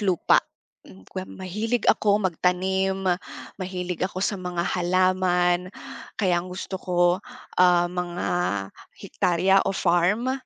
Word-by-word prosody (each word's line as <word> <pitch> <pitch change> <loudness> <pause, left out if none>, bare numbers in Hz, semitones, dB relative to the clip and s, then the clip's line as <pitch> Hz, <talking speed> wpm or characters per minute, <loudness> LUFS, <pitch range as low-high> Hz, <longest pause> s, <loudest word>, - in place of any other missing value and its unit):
lupa. 190 -5 +3 0.5
Hmm, 95 0 -15
kwe 185 - -7
mahilig 210 +5 -3
ako 205 0 +3
magtanim, 190 +2 0 0.6
mahilig 180 -1 -4
ako 185 +1 -3
sa 200 - -1
mga 180 -1 -2
halaman. 180 0 +1 0.5
Kaya 180 -4 +2
ang 180 - -9
gusto 190 +1 -5
ko, 180 -1 -3 0.6
ah, 175 -1 +5
mga 175 0 -3 0.7
hektarya 190 +2 +2
o 195 - -1
farm? 185 +9 +2
185 Hz, 115 wpm, -24 LUFS, 175-190 Hz, 0.7 s, ah